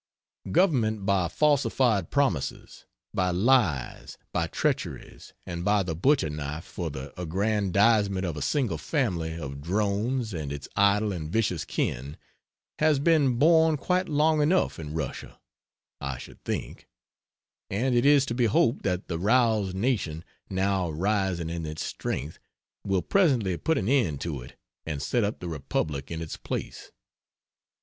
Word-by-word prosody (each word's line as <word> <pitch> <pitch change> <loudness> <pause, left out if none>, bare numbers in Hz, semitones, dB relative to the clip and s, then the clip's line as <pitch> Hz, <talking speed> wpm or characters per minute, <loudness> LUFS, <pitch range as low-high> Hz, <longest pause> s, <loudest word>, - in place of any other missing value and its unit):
Government 120 - +2
by 95 -3 +2
falsified 130 - +2
promises; 130 - -1 0.3
by 90 -1 +1
lies, 90 - +1 0.2
by - - 0
treacheries, - - -3
and 85 -1 -5
by 105 +1 +3
the 85 -3 -3
butcher 90 - +2
knife 75 +2 -5
for 85 -3 -5
the 70 -1 -7
aggrandizement 100 +2 +2
of 85 -4 -3
a 75 - -5
single 135 -7 0
family 85 - -1
of 70 -3 -6
drones 105 - -1
and 75 -5 -4
its 70 -1 -6
idle 100 +1 +3
and 80 -3 -5
vicious 100 -7 0
kin 70 +5 -3 0.6
has 155 -1 +4
been 145 -4 +3
borne 160 +2 +5
quite 180 +5 0
long 155 +1 +3
enough 170 - +2
in 75 -1 -6
Russia, 75 -5 -5 0.6
I 70 -2 -4
should - - -12
think, - - -5 0.8
and 125 +7 0
it 120 0 +3
is 140 -1 +5
to 120 - -3
be 120 0 +2
hoped 115 +3 +2
that 90 -1 -2
the 85 -2 -3
roused 110 -2 +2
nation, 95 -7 -1 0.2
now 95 -2 0
rising 90 0 -1
in 85 -1 -4
its 75 0 -4
strength, 75 +3 -4 0.4
will 95 -3 0
presently 130 - +2
put 160 - 0
an 95 - -1
end 115 - +2
to 75 -6 -3
it - - -12 0.3
and 75 -3 -4
set 120 - 0
up 105 +2 -1
the 90 - -6
republic 75 -2 -3
in 80 -1 -4
its 80 - -6
place. - - -6
100 Hz, 150 wpm, -27 LUFS, 80-125 Hz, 0.8 s, borne